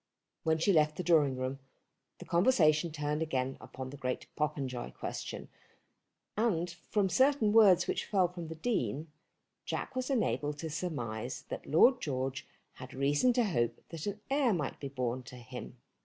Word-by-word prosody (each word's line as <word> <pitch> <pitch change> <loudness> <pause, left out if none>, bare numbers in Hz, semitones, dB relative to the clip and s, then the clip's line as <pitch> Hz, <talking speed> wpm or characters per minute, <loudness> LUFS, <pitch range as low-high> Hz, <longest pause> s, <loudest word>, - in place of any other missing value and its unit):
When 160 0 +2
she 190 +5 +3
left 155 -2 +3
the 180 - -2
drawing 150 -7 +4
room, 130 +1 -3 0.6
the - - -10
conversation 170 -5 +3
turned 150 0 -2
again 135 -4 -1
upon 130 0 -7
the 145 - -9
great 125 -1 -3
Popenjoy 140 -5 -2
question, - - -5 0.9
and 180 -6 +1 0.2
from 205 -2 +2
certain 235 - +3
words 195 -6 +7
which - - -2
fell 190 -3 +3
from 175 -1 -7
the 160 - -6
Dean, 155 - -2 0.5
Jack - - -4
was 255 +1 -2
enabled 150 - 0
to 160 +1 -5
surmise 125 -8 -4
that - - -6
Lord 245 - +5
George 130 -2 -3 0.3
had 130 +1 -10
reason 145 - +3
to 245 - +3
hope 120 - 0
that 165 +2 -6
an 205 +1 -3
heir 270 -5 +3
might 150 -6 -3
be 140 - -5
born 130 -2 -2
to 125 0 -11
him. 125 +1 -9
155 Hz, 165 wpm, -32 LUFS, 130-190 Hz, 0.9 s, words